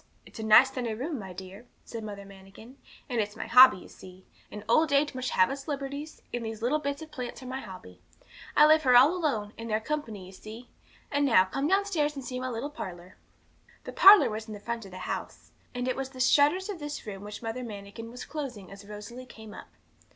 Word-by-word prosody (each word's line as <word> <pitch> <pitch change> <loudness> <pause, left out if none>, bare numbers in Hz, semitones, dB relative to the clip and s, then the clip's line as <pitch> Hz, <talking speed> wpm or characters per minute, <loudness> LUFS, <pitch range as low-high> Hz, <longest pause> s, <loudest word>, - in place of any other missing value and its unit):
'It's - - -13
a - - -4
nice 225 +5 +7
sunny 240 -4 -3
room, 275 +4 -4
my 190 -2 -8
dear,' 190 +5 -11 0.2
said 230 -2 -7
Mother 200 -2 -8
Manikin, 195 +5 -14 0.3
'and 240 -4 0
it's 205 0 -5
my - - -5
hobby, 255 -1 +8
you 180 - -12
see; 185 0 -14 0.3
and 210 - -8
old 310 +6 +3
age 285 +1 +2
must 255 -1 -3
have 185 +5 +3
its 275 0 -7
liberties, 285 +1 -5
and 240 -1 -3
these 220 0 -6
little 280 +6 +1
bits 280 +1 -4
of 315 - -13
plants 250 -1 -7
are - - -10
my 260 +1 -5
hobby. 90 - -12 0.6
I 300 - +8
live 310 +1 +6
here 255 -4 +4
all 285 +8 +6
alone, 230 - -2
and 230 0 -6
they're 215 0 +1
company, 225 -7 -5
you 185 - -12
see. 220 +5 -11 0.4
And 285 0 +1
now, 230 -9 +5
come 270 +9 -2
downstairs 360 -6 +1
and 270 -2 -7
see 250 +1 -4
my 255 0 -3
little 250 +5 -4
parlour.' 180 - -9 0.7
The - - -8
parlour 395 - +8
was 215 +1 -6
in 215 - -7
the - - -9
front 230 +1 -5
of 195 - -12
the 185 - -9
house, - - -6 0.2
and 245 0 -2
it 255 - 0
was 270 0 -4
the 260 -1 -13
shutters 295 +8 +3
of 405 -5 -5
this 295 0 -6
room 200 -2 -7
which 210 +2 -8
Mother 230 +3 -4
Manikin 210 0 -8
was 245 +2 -9
closing 265 - -7
as 200 +1 -12
Rosalie 225 +5 -9
came 220 -3 -12
up. - - -11
240 Hz, 230 wpm, -28 LUFS, 210-280 Hz, 0.7 s, hobby